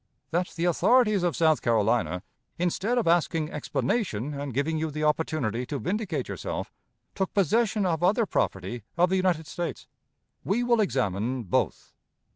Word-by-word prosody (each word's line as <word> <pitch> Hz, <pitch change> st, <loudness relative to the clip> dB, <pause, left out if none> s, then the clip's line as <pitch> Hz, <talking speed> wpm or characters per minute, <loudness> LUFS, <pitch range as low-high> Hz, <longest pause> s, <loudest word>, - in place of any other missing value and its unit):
That 175 Hz, +2 st, +1 dB
the 170 Hz, -, -1 dB
authorities 215 Hz, +3 st, +4 dB
of 175 Hz, -2 st, 0 dB
South 160 Hz, -2 st, +3 dB
Carolina, 110 Hz, -6 st, +1 dB, 0.3 s
instead 190 Hz, +7 st, 0 dB
of 235 Hz, -, +1 dB
asking 165 Hz, -2 st, +2 dB
explanation 145 Hz, -, -1 dB
and 140 Hz, -1 st, -4 dB
giving 145 Hz, +5 st, 0 dB
you 160 Hz, 0 st, -1 dB
the 155 Hz, +1 st, -4 dB
opportunity 150 Hz, -7 st, 0 dB
to 145 Hz, -, -3 dB
vindicate 180 Hz, -, -2 dB
yourself, -, -, -5 dB, 0.4 s
took 190 Hz, -, -2 dB
possession 210 Hz, +2 st, +2 dB
of 165 Hz, -3 st, 0 dB
other 205 Hz, +6 st, +3 dB
property 95 Hz, -, -2 dB, 0.2 s
of 175 Hz, +1 st, +4 dB
the 190 Hz, -, +2 dB
United 180 Hz, -4 st, +1 dB
States. 175 Hz, +3 st, -5 dB, 0.6 s
We 235 Hz, +5 st, +1 dB
will 240 Hz, -2 st, +3 dB
examine 125 Hz, -, -1 dB
both. 95 Hz, -, -1 dB
160 Hz, 150 wpm, -27 LUFS, 130-190 Hz, 0.6 s, authorities